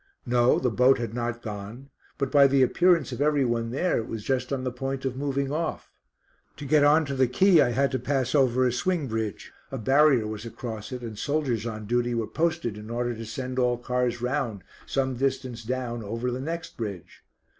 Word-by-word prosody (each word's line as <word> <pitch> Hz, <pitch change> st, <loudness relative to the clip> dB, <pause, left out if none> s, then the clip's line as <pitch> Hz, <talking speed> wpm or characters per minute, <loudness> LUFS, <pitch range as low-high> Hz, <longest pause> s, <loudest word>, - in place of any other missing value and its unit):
No, 120 Hz, 0 st, +3 dB
the 125 Hz, -, 0 dB
boat 125 Hz, +4 st, +4 dB
had 115 Hz, -2 st, -4 dB
not 120 Hz, 0 st, -3 dB
gone, 110 Hz, +5 st, -7 dB, 0.3 s
but 140 Hz, -2 st, -2 dB
by 140 Hz, -2 st, +7 dB
the 135 Hz, -1 st, +4 dB
appearance 170 Hz, +1 st, +3 dB
of -, -, -5 dB
every 145 Hz, -2 st, +3 dB
one 115 Hz, -1 st, -1 dB
there, 145 Hz, +7 st, 0 dB
it 110 Hz, -, -5 dB
was 110 Hz, -2 st, -5 dB
just 130 Hz, 0 st, -1 dB
on 135 Hz, -2 st, -1 dB
the 130 Hz, -, -2 dB
point 135 Hz, +2 st, -4 dB
of 130 Hz, -1 st, -1 dB
moving 140 Hz, 0 st, -1 dB
off. 160 Hz, +1 st, -3 dB, 0.7 s
To 145 Hz, -, -7 dB
get 145 Hz, +1 st, +4 dB
on 150 Hz, +2 st, +5 dB
to 140 Hz, -, -4 dB
the 130 Hz, -1 st, +3 dB
quay 175 Hz, +6 st, +5 dB
I -, -, +3 dB
had 135 Hz, +3 st, +1 dB
to 130 Hz, -, -1 dB
pass 135 Hz, -3 st, -1 dB
over 130 Hz, -3 st, +3 dB
a 125 Hz, -, +2 dB
swing 165 Hz, +5 st, 0 dB
bridge; 110 Hz, -3 st, -4 dB, 0.2 s
a 135 Hz, -, -5 dB
barrier 135 Hz, 0 st, +4 dB
was 105 Hz, 0 st, -5 dB
across 115 Hz, 0 st, -7 dB
it, 125 Hz, -1 st, -6 dB
and 110 Hz, -3 st, -7 dB
soldiers 135 Hz, -7 st, -1 dB
on 110 Hz, -2 st, -5 dB
duty 120 Hz, +2 st, 0 dB
were 115 Hz, -1 st, 0 dB
posted 160 Hz, -8 st, -1 dB
in 105 Hz, +1 st, -10 dB
order 120 Hz, +1 st, -1 dB
to 115 Hz, -1 st, -7 dB
send 130 Hz, +3 st, -4 dB
all 125 Hz, -1 st, +2 dB
cars 125 Hz, -1 st, -1 dB
round, 125 Hz, -7 st, -2 dB, 0.2 s
some 130 Hz, -2 st, -1 dB
distance 130 Hz, -3 st, -2 dB
down, 120 Hz, 0 st, -3 dB
over 115 Hz, +4 st, -3 dB
the 125 Hz, +1 st, -4 dB
next 165 Hz, +4 st, -5 dB
bridge. 100 Hz, -6 st, -6 dB
125 Hz, 210 wpm, -26 LUFS, 115-140 Hz, 0.7 s, by